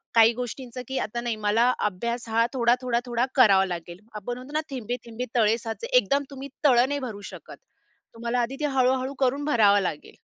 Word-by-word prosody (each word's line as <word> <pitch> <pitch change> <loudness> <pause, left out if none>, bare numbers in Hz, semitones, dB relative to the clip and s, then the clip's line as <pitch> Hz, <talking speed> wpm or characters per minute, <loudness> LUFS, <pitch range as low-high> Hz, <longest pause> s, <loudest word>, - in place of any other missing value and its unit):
काही 230 +1 +7
गोष्टींचं, 250 +1 -6
की 265 - -3
आता 235 +3 -3
नाही 240 -1 -2
मला 230 +4 +4 0.2
अभ्यास 235 +5 -4
हा 230 +1 +3
थोडा-थोडा-थोडा 245 0 +1
करावा 200 -7 +6
लागेल. 175 -1 -6 0.2
आपण 240 +4 -5
म्हणतो 260 +4 -11
ना 310 - +1
थेंबे-थेंबे 245 -2 -5
तळे 225 -1 +3
साचे. 230 - -6
एकदम 285 - +2
तुम्ही 275 +1 -8 0.2
तळं 250 -2 +5
नाही 285 0 -1
भरू 225 -6 -6
शकत. - - -12 0.6
तुम्हाला 235 +2 -2
आधी 240 +3 -2
ते 300 - -1
हळू-हळू 260 -1 +1
करून 275 +2 +1
भरावं 210 -8 +4
लागेल. 155 -5 -5
240 Hz, 175 wpm, -25 LUFS, 225-260 Hz, 0.6 s, काही